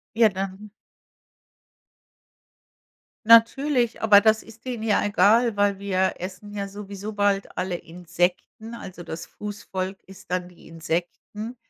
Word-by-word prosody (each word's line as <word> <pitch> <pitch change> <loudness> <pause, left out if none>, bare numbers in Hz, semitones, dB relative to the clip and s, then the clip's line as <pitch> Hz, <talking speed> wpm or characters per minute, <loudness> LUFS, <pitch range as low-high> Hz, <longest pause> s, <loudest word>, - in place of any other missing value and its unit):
Ja, 225 -1 +6
dann 195 +2 -6 2.6
Natürlich, 235 +2 +4
aber 210 -2 +7
das 220 0 +3
ist 225 +2 -16
denen 245 -4 -4
ja 215 -2 +2
egal, 210 +3 +4
weil 205 -1 +2
wir 190 -1 0
essen 190 +3 -8
ja 200 -1 -3
sowieso 205 +1 -7
bald 205 -1 0
alle 180 0 -2
Insekten, 175 +6 -3
also 185 -6 -9
das 160 - -7
Fußvolk 195 -2 -6
isst 190 -2 -14
dann 180 0 -2
die 180 - -18
Insekten. 175 +8 -4
200 Hz, 125 wpm, -24 LUFS, 185-220 Hz, 2.6 s, aber